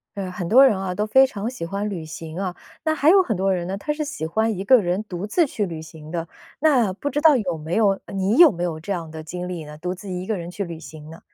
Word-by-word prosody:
呃， 190 -2 -4
很 180 -1 -4
多 255 +8 +7
人 230 -7 +3
啊， 185 -1 -3
都 210 - 0
非 265 +5 +5
常 215 -2 -4
喜 245 -10 -6
欢 200 +4 -3
旅 175 -6 -5
行 160 +2 -7
啊， 185 -2 -3 0.3
那 315 0 +2
还 300 0 +4
有 385 +2 +7
很 240 - -1
多 190 +1 +1
人 175 -1 -2
呢， 190 +1 -3
他 300 - -3
是 300 0 -2
喜 280 - -5
欢 220 +5 0
一 190 - -3
个 250 +3 +6
人 180 +2 -1
独 195 -1 -5
自 335 - +3
去 225 -7 -2
旅 165 -4 -6
行 160 -1 -12
的。 165 0 -3 0.3
那 255 -10 +3
不 280 +9 -4
知 285 - -1
道 310 -1 +6
有 185 -9 -1
没 160 +2 -4
有 220 -2 +4 0.2
呃， - - -10
你 195 +3 +1
有 340 -1 +9
没 175 -3 -4
有 165 -3 -2
这 180 +5 -3
样 165 -4 -5
的 160 0 -7
经 180 +3 -6
历 170 -4 -5
呢， 150 0 -10
独 180 +3 -3
自 190 +2 -10
一 180 0 -4
个 215 0 -1
人 170 -1 -6
去 200 +3 -4
旅 170 -3 -7
行 155 -1 -11
呢？ 165 +1 -11
190 Hz, 315 characters per minute, -23 LUFS, 170-225 Hz, 0.3 s, 有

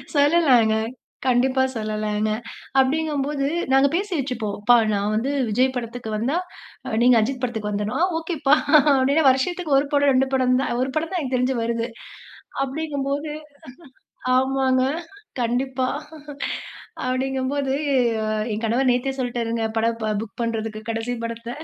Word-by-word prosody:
சொல்லலாங்க. 285 -7 +4 0.5
கண்டிப்பா 260 +1 +3
சொல்லலாங்க. 215 -1 -1 0.5
அப்படிங்கும்போது 285 0 0 0.3
நாங்க 270 +1 +5
பேசி 400 +3 -2
வச்சிப்போம். 240 -6 -3
"ப்பா 245 +3 +6 0.2
நான் 205 +1 0
வந்து 245 +6 0 0.2
விஜய் 255 +5 +2
படத்துக்கு 235 -1 -5
வந்தா, 245 +9 0 0.6
நீங்க 245 0 +6
அஜித் 250 +3 -2
படத்துக்கு 220 -4 -2
வந்துரனும்". 210 +4 -2
"ஆ - - +6
ஓகேப்பா!" 315 -4 +2 0.4
அப்டின்னு 275 +3 +3
வருஷத்துக்கு 295 +4 +1
1 280 +1 +1
படம், 285 -1 +4
2 265 +1 +3
படம் 255 -1 +3
தான் 270 - -1
1 260 +1 -1
தான் 330 +4 -1
எனக்கு 265 -4 -2
தெரிஞ்சு 255 +1 +1
வருது. 230 0 -1 0.8
அப்படிங்கும்போது 285 +1 -3 1.1
ஆமாங்க 260 0 +2 0.6
கண்டிப்பா. 255 +2 0 1.2
அப்படிங்கும்போது 265 +1 -1 0.8
என் 215 +2 -4
கணவர் 250 +4 +2
நேத்தே 250 +2 0
சொல்லிட்டாருங்க. 235 -2 -2
படம் 230 +1 0
ப 215 0 0
புக் 225 +1 -10
பண்றதுக்கு 220 -1 -3
கடைசி 225 +2 -3
படத்த. 230 0 -6
255 Hz, 125 wpm, -23 LUFS, 230-275 Hz, 1.2 s, ப்பா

